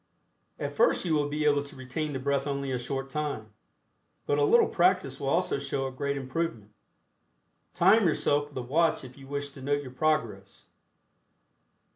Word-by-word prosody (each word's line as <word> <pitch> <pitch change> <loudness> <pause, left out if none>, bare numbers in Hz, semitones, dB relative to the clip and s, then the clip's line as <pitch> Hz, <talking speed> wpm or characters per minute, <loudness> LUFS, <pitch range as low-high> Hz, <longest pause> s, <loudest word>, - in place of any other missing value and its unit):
At - - -4
first - - +3
you 165 - +1
will 145 -1 +1
be 150 +1 -1
able 145 -1 +4
to 145 +1 -10
retain 130 +4 -4
the 135 - -3
breath 140 +1 0
only 140 -1 -2
a 125 - -1
short 135 +2 -3
time, 140 -7 -4 0.7
but 145 - +1
a - - +3
little 235 +11 +5
practice 175 -7 +2
will 135 - -2
also 170 -2 +1
show 135 -1 -2
a 135 - -3
great 140 +2 -2
improvement. 130 -5 -3 1.0
Time 190 +4 +5
yourself 145 -2 +1
with 145 - -11
a 125 - -2
watch 160 +7 +1
if 130 -1 -11
you 135 -1 -13
wish 140 0 -4
to 140 - -12
note 145 +2 0
your 130 - -9
progress. 125 -9 -1
140 Hz, 180 wpm, -28 LUFS, 135-155 Hz, 1.0 s, little